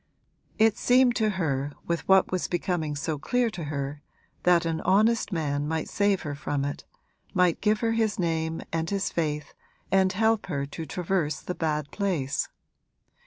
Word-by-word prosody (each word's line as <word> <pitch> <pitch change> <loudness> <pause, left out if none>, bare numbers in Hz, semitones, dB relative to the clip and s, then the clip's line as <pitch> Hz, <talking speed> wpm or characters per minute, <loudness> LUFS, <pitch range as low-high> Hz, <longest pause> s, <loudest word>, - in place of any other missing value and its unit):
'It 220 -1 +4
seemed 250 -1 +4
to 220 -2 +2
her, 145 -4 -1
with 170 0 -2
what 190 -1 +5
was 185 -1 0
becoming 175 -4 -1
so 150 +1 -2
clear 245 - +1
to 175 -5 -6
her, 145 0 -4 0.4
that 175 -1 +4
an 165 -1 -1
honest 215 +5 +3
man 145 -4 -1
might 160 0 -2
save 200 -2 +1
her 150 -3 -3
from 140 -1 -2
it, 145 - -4 0.5
might 180 -2 +3
give 215 0 +2
her 230 -1 +2
his 225 -2 +1
name 165 -2 -1
and 165 0 -1
his 200 -1 -1
faith 150 -3 -2 0.4
and 190 0 +3
help 220 +2 +2
her 140 -1 -2
to 160 +3 -7
traverse 175 -4 -1
the 180 - -4
bad 150 -3 -2
place. 165 -9 -1
170 Hz, 165 wpm, -27 LUFS, 150-200 Hz, 0.5 s, what